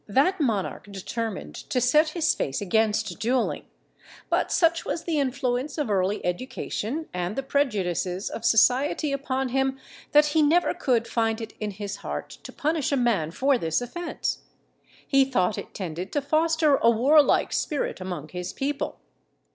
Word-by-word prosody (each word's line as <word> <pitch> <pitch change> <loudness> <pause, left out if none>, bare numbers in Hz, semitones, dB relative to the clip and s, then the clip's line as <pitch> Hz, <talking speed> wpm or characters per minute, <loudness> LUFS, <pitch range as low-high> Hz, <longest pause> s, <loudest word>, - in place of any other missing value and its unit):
that 285 - +2
monarch 205 -5 -1
determined 215 +2 -4
to 255 - -3
set 300 +6 +4
his 320 0 +1
face 135 - -2
against 210 -1 0
duelling; 240 +2 0 0.7
but - - +1
such 330 -1 +3
was 335 - -3
the 320 -3 0
influence 260 +1 -1
of 290 -8 -1
early 195 +1 0
education 255 - -3
and 180 +2 -2
the 270 - -2
prejudices 195 - -1
of 225 - -6
society 255 +6 +3
upon 265 -1 -1
him, 265 +1 0 0.3
that 295 0 +6
he 305 +1 +2
never 320 +4 +3
could 245 -9 0
find 225 -1 0
it 225 -1 -7
in 215 - -2
his 200 0 -5
heart - - -5
to - - -9
punish 305 -1 -1
a 280 - +2
man 230 -11 +1
for 265 +8 +1
this 160 -4 0
offence. 335 +8 -3 0.7
He 275 -1 +4
thought 220 -7 0
it - - -9
tended 180 0 -5
to 290 - +1
foster 315 0 +3
a 230 - +4
warlike 280 +6 +4
spirit 290 -9 -2
among 175 -5 -5
his 180 +2 -5
people. 280 +1 -3
250 Hz, 160 wpm, -25 LUFS, 205-290 Hz, 0.7 s, that